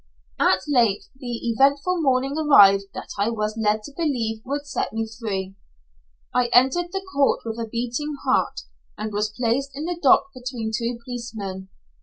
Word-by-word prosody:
At 185 Hz, -, +3 dB
length 235 Hz, -8 st, +2 dB
the 250 Hz, -2 st, -6 dB, 0.2 s
eventful 280 Hz, +8 st, +2 dB
morning 270 Hz, -1 st, +1 dB
arrived 200 Hz, -11 st, +6 dB
that -, -, -7 dB
I 205 Hz, +3 st, +2 dB
was 215 Hz, -1 st, -2 dB
led 215 Hz, -1 st, +1 dB
to 285 Hz, -, -10 dB
believe 235 Hz, -9 st, -1 dB
would 285 Hz, +2 st, -3 dB
set 285 Hz, -, -3 dB
me 225 Hz, 0 st, -2 dB
free. 205 Hz, -4 st, -4 dB, 0.8 s
I 250 Hz, -1 st, +2 dB
entered 265 Hz, +9 st, +3 dB
the 385 Hz, 0 st, -4 dB
court 275 Hz, -1 st, +2 dB
with 225 Hz, 0 st, -4 dB
a 225 Hz, -1 st, -4 dB
beating 245 Hz, +6 st, -3 dB
heart, 185 Hz, -, +1 dB, 0.4 s
and 215 Hz, -1 st, -4 dB
was 210 Hz, +1 st, 0 dB
placed 245 Hz, +5 st, 0 dB
in 295 Hz, +3 st, -4 dB
the 350 Hz, 0 st, -3 dB
dock 275 Hz, 0 st, +5 dB
between 245 Hz, -3 st, -5 dB
two 235 Hz, +1 st, -2 dB
policemen. 210 Hz, -6 st, -6 dB
240 Hz, 165 wpm, -23 LUFS, 215-275 Hz, 0.8 s, arrived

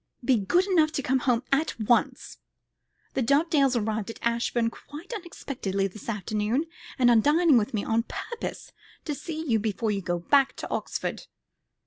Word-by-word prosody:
Be 260 Hz, -, +4 dB
good 350 Hz, -, +2 dB
enough 330 Hz, -6 st, +3 dB
to 280 Hz, -, -2 dB
come 260 Hz, +1 st, +2 dB
home 245 Hz, -1 st, +1 dB
at 275 Hz, -3 st, +1 dB
once. 230 Hz, +2 st, 0 dB, 0.7 s
The -, -, 0 dB
Dovedales 280 Hz, +1 st, +3 dB
arrived 220 Hz, -1 st, -1 dB
at 230 Hz, -, -7 dB
Ashbourne 235 Hz, 0 st, 0 dB
quite 295 Hz, -, -10 dB
unexpectedly 260 Hz, -, -3 dB
this 205 Hz, +4 st, -10 dB
afternoon, 215 Hz, -, -1 dB, 0.3 s
and 245 Hz, -2 st, +5 dB
are -, -, +6 dB
dining 300 Hz, +6 st, +4 dB
with 215 Hz, +1 st, -3 dB
me 205 Hz, -, -1 dB
on 225 Hz, +1 st, 0 dB
purpose 470 Hz, -, -6 dB, 0.3 s
to 300 Hz, -, -2 dB
see 320 Hz, +2 st, -5 dB
you 225 Hz, -4 st, +3 dB
before 215 Hz, +1 st, -1 dB
you 200 Hz, -1 st, -1 dB
go 175 Hz, -1 st, -1 dB
back 270 Hz, +10 st, +3 dB
to -, -, -7 dB
Oxford. -, -, -3 dB
245 Hz, 165 wpm, -27 LUFS, 220-295 Hz, 0.7 s, are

